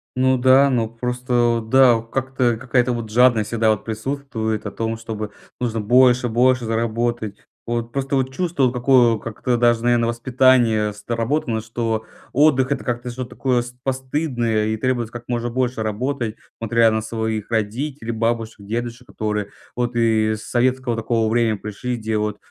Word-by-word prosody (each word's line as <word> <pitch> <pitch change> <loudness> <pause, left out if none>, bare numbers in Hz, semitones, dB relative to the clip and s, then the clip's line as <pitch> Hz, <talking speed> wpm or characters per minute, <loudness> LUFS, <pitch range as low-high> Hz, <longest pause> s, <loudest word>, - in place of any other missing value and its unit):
Ну 130 0 +3
да, 130 +2 +5
ну 115 -4 0
просто, 125 +2 -4 0.2
вот 110 -1 -4
да, 130 -1 +6
вот 115 0 -6
как-то 130 -2 0
какая-то 125 0 +1
вот 115 -2 -5
жадность 115 -1 +4
всегда 110 -1 +2
вот 105 - -2
присутствует 110 -2 -3
о - - -5
том, 115 +2 -3
чтобы 110 -2 -6 0.3
нужно 115 -3 -1
больше, 125 +2 +4
больше 125 +2 +2
заработать. 115 -1 -1 0.3
Вот 120 0 -3
просто 135 +2 -2
вот 130 0 -1
чувство, 170 -1 -1
вот 125 - +1
какое, 125 -2 +4
как-то 120 +3 -2
даже 120 -1 +3
наверно 120 -1 +3
воспитание 120 -3 +2
сработано, 115 +2 -2
что 110 0 -3 0.3
отдых- 140 -1 +3
это 140 - -1
как-то 125 0 -3
что-то 125 0 -6
такое 125 -2 0
с 120 - -9
постыдное 130 -5 -1
и 110 0 -1
требует 120 -1 -1
как 120 0 -8
можно 120 -1 -2
больше 125 -1 -1
работать, 115 +2 -2 0.3
смотря 115 0 +3
на 110 0 0
своих 110 -1 -3
родителей, 115 +4 -2
бабушек, 115 -2 -2
дедушек, 120 +2 -4
которые 105 -1 -3 0.3
вот 120 0 -2
и 110 -2 +2
с 110 - -10
советского 125 +1 0
такого 115 0 0
времени 115 -2 +2
пришли, 105 +5 -4
делают 105 -1 -2
120 Hz, 165 wpm, -21 LUFS, 110-125 Hz, 0.3 s, да